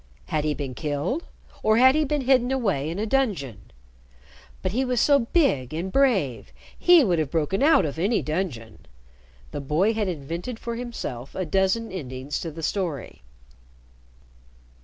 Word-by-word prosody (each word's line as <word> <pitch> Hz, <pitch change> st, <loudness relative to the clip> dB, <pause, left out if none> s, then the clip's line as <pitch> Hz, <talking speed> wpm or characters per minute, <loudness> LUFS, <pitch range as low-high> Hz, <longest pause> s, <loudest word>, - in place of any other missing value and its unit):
Had 150 Hz, -1 st, 0 dB
he 150 Hz, -1 st, 0 dB
been 135 Hz, -2 st, -5 dB
killed, 150 Hz, -, -2 dB, 0.4 s
or 215 Hz, +1 st, +3 dB
had 260 Hz, +2 st, +7 dB
he 310 Hz, +1 st, +2 dB
been 295 Hz, 0 st, -1 dB
hidden 255 Hz, -1 st, +3 dB
away 195 Hz, -, 0 dB
in 170 Hz, -, -4 dB
a 210 Hz, -, -1 dB
dungeon? 190 Hz, -, -1 dB, 0.9 s
But 185 Hz, -, 0 dB
he 250 Hz, +6 st, 0 dB
was 250 Hz, -2 st, 0 dB
so 285 Hz, +3 st, +5 dB
big 155 Hz, -, +2 dB
and 180 Hz, +4 st, -3 dB
brave, 190 Hz, -, +1 dB, 0.2 s
he 350 Hz, -3 st, +6 dB
would 180 Hz, -8 st, +1 dB
have 155 Hz, -3 st, -1 dB
broken 165 Hz, -, 0 dB
out 310 Hz, -, +5 dB
of 150 Hz, +1 st, -4 dB
any 205 Hz, +6 st, +1 dB
dungeon. 150 Hz, -, -4 dB, 0.6 s
The -, -, -4 dB
boy 160 Hz, +10 st, +1 dB
had 215 Hz, -2 st, -1 dB
invented 170 Hz, -, -5 dB
for 235 Hz, +1 st, -5 dB
himself 225 Hz, -, -6 dB
a 185 Hz, -, -2 dB
dozen 190 Hz, +7 st, +1 dB
endings 135 Hz, -5 st, -5 dB
to 165 Hz, -, -4 dB
the 160 Hz, +1 st, -9 dB
story. 165 Hz, -, -3 dB
185 Hz, 160 wpm, -25 LUFS, 145-245 Hz, 0.9 s, had